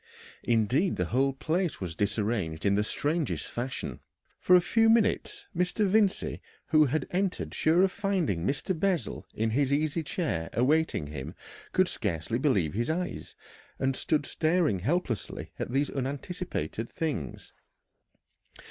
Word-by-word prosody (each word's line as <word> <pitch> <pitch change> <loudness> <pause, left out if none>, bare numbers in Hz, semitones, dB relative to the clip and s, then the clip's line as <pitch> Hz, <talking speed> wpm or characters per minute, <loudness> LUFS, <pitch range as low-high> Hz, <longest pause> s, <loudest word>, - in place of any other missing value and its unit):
Indeed 120 - +2
the 90 - 0
whole 130 +9 +2
place 160 +6 -1
was 90 -4 -4
disarranged 100 -5 -1
in 100 - +4
the 105 +1 +2
strangest 150 +7 -1
fashion. 125 +2 -4 0.4
For 180 - +5
a - - +8
few 225 +6 +3
minutes 405 - +2
Mr. 180 +4 +1
Vincey, 200 0 +2 0.2
who 155 -1 +5
had 140 +1 0
entered 190 +1 -1
sure 165 +4 +3
of 190 - +3
finding 190 - 0
Mr. 140 - -1
Bessel 190 -3 -1
in 110 +1 0
his 140 +3 +1
easy 155 +3 +1
chair 140 - -2
awaiting 140 - +2
him, 70 -2 -7 0.4
could - - +3
scarcely 85 +9 -2
believe 100 - +2
his 120 +6 -1
eyes, 175 +3 -3 0.4
and 135 0 0
stood 150 +1 0
staring 155 - +1
helplessly 125 - -2
at - - -3
these 140 +2 +1
unanticipated 135 - -4
things. 145 - -4
145 Hz, 140 wpm, -29 LUFS, 110-175 Hz, 0.4 s, a